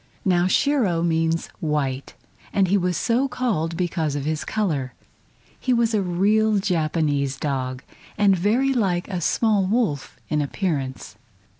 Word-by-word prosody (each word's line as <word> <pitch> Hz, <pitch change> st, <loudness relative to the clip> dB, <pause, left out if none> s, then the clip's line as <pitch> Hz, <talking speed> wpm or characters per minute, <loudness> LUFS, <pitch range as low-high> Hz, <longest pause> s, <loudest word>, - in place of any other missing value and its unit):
Now 180 Hz, -2 st, +3 dB
Shiro 205 Hz, -, +2 dB
means 165 Hz, 0 st, +1 dB
"white," 140 Hz, -4 st, -2 dB, 0.4 s
and 195 Hz, -2 st, +2 dB
he 200 Hz, -, +3 dB
was 180 Hz, -3 st, +1 dB
so 240 Hz, +5 st, +1 dB
called 205 Hz, -11 st, -1 dB
because 165 Hz, -5 st, -1 dB
of 145 Hz, -1 st, -3 dB
his 155 Hz, 0 st, -1 dB
color. 150 Hz, -, -2 dB, 0.6 s
He 255 Hz, -, +1 dB
was 235 Hz, -1 st, +2 dB
a 210 Hz, -, +2 dB
real 205 Hz, +4 st, +2 dB
Japanese 155 Hz, -7 st, 0 dB
dog, 130 Hz, -2 st, -3 dB, 0.3 s
and 205 Hz, -2 st, +4 dB
very 230 Hz, +9 st, +2 dB
like 190 Hz, -7 st, 0 dB
a 180 Hz, -3 st, -3 dB
small 205 Hz, +1 st, +2 dB
wolf 195 Hz, -, -1 dB
in 150 Hz, -1 st, 0 dB
appearance. 140 Hz, -, -3 dB
175 Hz, 140 wpm, -23 LUFS, 150-210 Hz, 0.6 s, and